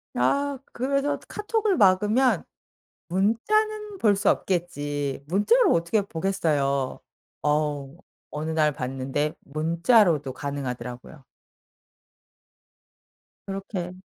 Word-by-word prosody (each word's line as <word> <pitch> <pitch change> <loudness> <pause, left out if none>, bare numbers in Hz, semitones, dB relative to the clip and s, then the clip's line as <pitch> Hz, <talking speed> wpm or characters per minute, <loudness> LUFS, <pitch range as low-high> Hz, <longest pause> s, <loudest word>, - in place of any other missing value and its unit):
아 280 0 +1 0.4
그래서 285 +1 0
'카톡을 420 -1 0
막으면 210 +2 +4 0.7
문자는 415 - 0
볼 210 - +3
수 200 +1 +1
없겠지.' 145 -6 -1
문자로 365 - +3
어떻게 170 +5 +1
보겠어요. 155 -8 -1 0.4
어우 150 -1 -1 0.3
어느 155 +2 -4
날 155 -2 +2
봤는데 135 +3 -2
문자로도 165 - +2
가능하더라고요. 130 0 -6 2.2
그렇게 195 -2 -4
170 Hz, 215 characters per minute, -25 LUFS, 145-220 Hz, 2.2 s, 막으면